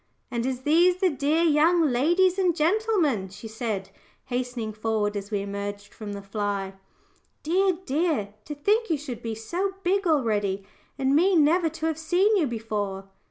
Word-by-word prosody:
"And 235 0 -1
is 260 -1 -3
these 345 +5 +4
the 370 -1 +2
dear 295 +4 +1
young 330 +2 +4
ladies 350 +9 +3
and 360 -3 +2
gentleman?" 330 - +1
she 200 +4 -10
said, 220 -3 -4 0.3
hastening 245 -3 -3
forward 215 -1 -1
as 200 0 -5
we 205 -2 -1
emerged 200 0 -6
from 210 -2 -7
the 200 0 -7
fly. 200 -1 -3 0.7
"Dear, 370 +3 +2
dear! 280 - 0
to 295 - -6
think 420 +10 +1
you 320 - +2
should 270 -5 -7
be 225 -1 -4
so 355 - -3
big 390 +1 +1
already, 205 - +1 0.3
and 270 +1 +2
me 365 +5 +4
never 325 +2 +4
to 320 +1 -5
have 320 -1 -1
seen 370 +7 +2
you 340 -7 +2
before!" 205 -4 -4
275 Hz, 165 wpm, -26 LUFS, 210-345 Hz, 0.7 s, these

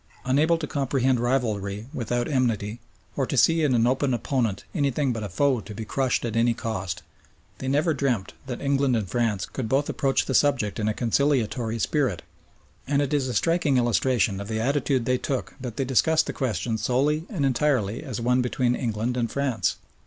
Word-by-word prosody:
Unable 150 +6 +3
to 165 - -4
comprehend 135 -3 +1
rivalry 110 -5 -1
without 120 -2 -1
enmity, 115 -5 0 0.4
or 135 -2 0
to 140 - -2
see 165 +6 +4
in 145 -5 +2
an 115 -1 +3
open 130 +1 +1
opponent 120 -5 -1
anything 140 -4 +1
but 115 - -4
a 100 - -4
foe 130 +5 +1
to 105 - -9
be 110 +1 -5
crushed 130 +1 0
at 115 -2 -3
any 115 0 +3
cost, 110 -7 -4 0.6
they 130 - -4
never 150 +5 +2
dreamed 130 -8 -1
that 125 -3 -5
England 140 -2 +2
and 110 -4 -1
France 105 -2 0
could 120 -5 -5
both 140 +3 +1
approach 135 -1 +1
the 130 - -2
subject 130 -8 +2
in 105 - 0
a 110 - +1
conciliatory 120 -2 +1
spirit, 120 - 0 0.6
and 140 0 +2
it 145 0 0
is 140 -3 +1
a 125 - -3
striking 165 -5 +2
illustration 120 -4 +1
of 100 - -6
the 110 0 -2
attitude 135 0 +1
they 125 +1 +1
took 135 -2 -3
that 125 -3 -6
they 135 - 0
discussed 155 +5 +3
the - - -4
question 115 - -2
solely 145 - +1
and 170 -11 -1
entirely 130 -5 +1
as 130 -8 -5
one 125 +2 +2
between 125 0 +1
England 120 0 -2
and 120 -2 0
France. 125 - 0
125 Hz, 190 wpm, -25 LUFS, 115-140 Hz, 0.6 s, see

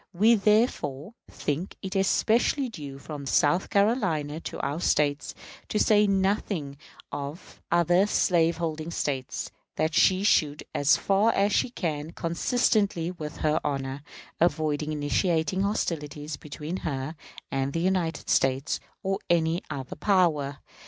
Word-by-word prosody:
We, 215 +6 +5
therefore, 210 - +1 0.2
think 155 +6 -3
it 190 +1 -5
especially 230 +7 +2
due 145 -10 -8
from 140 0 -7
South 160 +7 +2
Carolina 190 - +1
to - - -7
our 145 +3 -2
States 145 -4 +1 0.3
to - - -1
say 210 0 +4
nothing 190 -7 0 0.3
of 145 +4 -7
other 175 +3 +4
slaveholding 165 -4 +1
States 135 -6 -3 0.2
that 155 +1 0
she 185 +5 +4
should, 150 -8 +2
as 145 0 +4
far 200 +3 +3
as 200 +1 +2
she 245 - +2
can, 160 -7 -4
consistently 190 0 +1
with 155 -4 -7
her 155 +1 +3
honor, 135 -1 -3 0.4
avoid 155 -3 +1
initiating 160 +4 0
hostilities 155 -7 -2
between 150 +4 -6
her 140 -2 -4 0.4
and 135 0 -1
the 165 - -2
United 180 -2 0
States 135 +3 +1 0.2
or 195 0 -1
any 165 0 +2
other 135 -4 -5
power. 150 -6 +2
165 Hz, 125 wpm, -27 LUFS, 145-195 Hz, 0.4 s, We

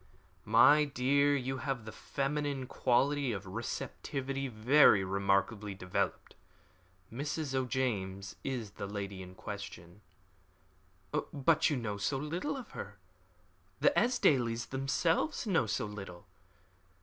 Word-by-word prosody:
"My 120 +8 +6
dear, 140 +1 +2
you 130 0 -2
have 130 -5 -3
the 110 - -7
feminine 140 +2 -2
quality 135 +2 +1
of 95 -4 -4
receptivity 135 0 -4
very 115 -2 +5
remarkably 100 +2 0
developed. 95 -1 -2 0.8
Mrs. 145 +2 -3
O'James 110 -7 -2
is 120 -6 -3
the 100 - -6
lady 100 -1 -5
in 90 0 -10
question." 100 -3 -8 1.3
"But 155 +1 +3
you 145 - 0
know 110 -4 -3
so 120 +7 -1
little 170 - -3
of 255 - -9
her. 100 0 -8 0.8
The - - +5
Esdailes 125 - +2
themselves 145 - 0
know 170 - +2
so 105 0 -1
little. 100 -3 -8
125 Hz, 115 wpm, -32 LUFS, 100-140 Hz, 1.3 s, My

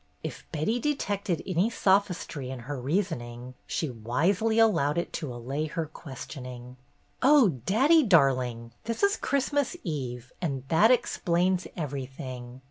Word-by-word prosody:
If - - -7
Betty 170 +10 0
detected 205 - -1
any 185 +3 +1
sophistry 190 - +1
in 130 -2 -6
her 135 +2 -5
reasoning, 130 -6 -2
she 160 - -1
wisely 170 - +1
allowed 170 -10 +3
it 170 - -2
to 150 -5 -4
allay 135 +6 -3
her 165 +1 -3
questioning. 130 -4 -9 0.4
"Oh, 250 - +5
daddy 280 - +5
darling, 130 - +2
this 230 - -3
is 400 +1 +4
Christmas 280 +2 0
Eve, 125 - -4
and 140 -7 -2
that 205 +8 +5
explains 185 -6 +2
everything. 130 -4 -6
155 Hz, 125 wpm, -28 LUFS, 130-205 Hz, 0.4 s, Oh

